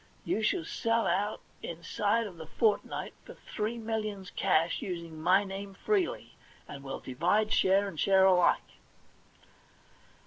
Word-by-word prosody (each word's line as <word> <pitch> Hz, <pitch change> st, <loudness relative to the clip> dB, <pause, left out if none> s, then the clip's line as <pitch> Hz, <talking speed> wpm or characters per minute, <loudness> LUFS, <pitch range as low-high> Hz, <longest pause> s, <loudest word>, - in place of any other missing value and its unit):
You 220 Hz, -, 0 dB
shall 215 Hz, -6 st, +1 dB
sell 230 Hz, +5 st, 0 dB
out 205 Hz, +3 st, 0 dB, 0.2 s
inside 205 Hz, +7 st, -1 dB
of 185 Hz, -5 st, -9 dB
the 160 Hz, -1 st, -9 dB
fortnight 210 Hz, +3 st, 0 dB
for -, -, -12 dB
three 220 Hz, +2 st, -4 dB
millions 215 Hz, -4 st, -4 dB
cash, 170 Hz, -3 st, +1 dB
using 170 Hz, -4 st, -6 dB
my 185 Hz, +5 st, +4 dB
name 195 Hz, 0 st, -7 dB
freely, 390 Hz, -, -1 dB, 0.3 s
and 140 Hz, -2 st, -9 dB
we'll 135 Hz, -, -6 dB
divide, 180 Hz, -, +1 dB
share 195 Hz, +2 st, +3 dB
and 175 Hz, -6 st, -7 dB
share 190 Hz, -1 st, +5 dB
alike.' 180 Hz, -2 st, +3 dB
195 Hz, 135 wpm, -30 LUFS, 170-215 Hz, 0.3 s, share